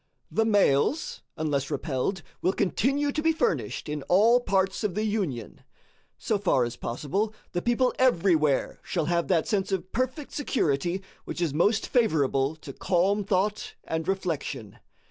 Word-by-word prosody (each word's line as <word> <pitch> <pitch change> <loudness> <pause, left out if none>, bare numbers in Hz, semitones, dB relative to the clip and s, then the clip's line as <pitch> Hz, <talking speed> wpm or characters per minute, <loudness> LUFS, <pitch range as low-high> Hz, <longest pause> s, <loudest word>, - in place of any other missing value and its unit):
The 225 - +2
mails, 205 - +2 0.2
unless 145 -4 -1
repelled, 150 +4 -2 0.2
will 185 - +2
continue 280 +9 +1
to 305 - -2
be 325 +1 +3
furnished 320 - -1
in 150 0 -3
all 220 +7 +5
parts 195 -3 0
of 200 -4 -1
the 215 - 0
Union. 185 - -3 0.6
So 215 -3 -1
far 175 -10 +2
as 120 0 -3
possible, 175 - -2 0.2
the 175 - -1
people 240 +3 +2
everywhere 170 - +2
shall 170 -4 -2
have 170 0 0
that 170 -4 +2
sense 200 -3 0
of 190 -1 -2
perfect 255 +4 -2
security 175 - 0 0.2
which - - -5
is 170 -5 0
most 205 +8 +2
favorable 150 - +1
to 150 -3 -10
calm 195 +6 +1
thought 200 +2 -1
and 160 0 -3
reflection. 155 - -3
190 Hz, 150 wpm, -27 LUFS, 150-220 Hz, 0.6 s, all